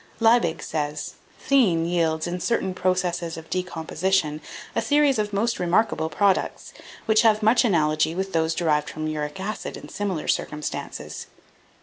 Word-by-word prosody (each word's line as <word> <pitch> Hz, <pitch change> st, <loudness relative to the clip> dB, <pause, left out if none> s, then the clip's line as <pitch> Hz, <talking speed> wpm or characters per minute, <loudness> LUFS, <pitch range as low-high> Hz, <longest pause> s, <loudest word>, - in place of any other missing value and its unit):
Liebig 225 Hz, -8 st, +3 dB
says, 150 Hz, -2 st, -3 dB, 0.3 s
"Theine 200 Hz, -13 st, +4 dB
yields, 165 Hz, -2 st, 0 dB
in 175 Hz, +1 st, -3 dB
certain 190 Hz, -2 st, 0 dB
processes 180 Hz, -2 st, -1 dB
of 160 Hz, 0 st, -11 dB
decomposition, 175 Hz, -2 st, -1 dB, 0.3 s
a -, -, +2 dB
series 290 Hz, -4 st, +3 dB
of 210 Hz, -1 st, -1 dB
most 225 Hz, +4 st, 0 dB
remarkable 175 Hz, -2 st, +1 dB
products, 195 Hz, +4 st, 0 dB, 0.3 s
which 220 Hz, -1 st, +4 dB
have 215 Hz, -2 st, +3 dB
much 225 Hz, +4 st, +5 dB
analogy 155 Hz, -6 st, +2 dB
with 190 Hz, +1 st, -3 dB
those 160 Hz, 0 st, +1 dB
derived 150 Hz, -3 st, +1 dB
from 155 Hz, 0 st, -5 dB
uric 155 Hz, +2 st, -3 dB
acid 210 Hz, +3 st, -4 dB
in -, -, -11 dB
similar 195 Hz, -6 st, -3 dB
circumstances. 150 Hz, 0 st, -3 dB
175 Hz, 140 wpm, -24 LUFS, 160-210 Hz, 0.3 s, much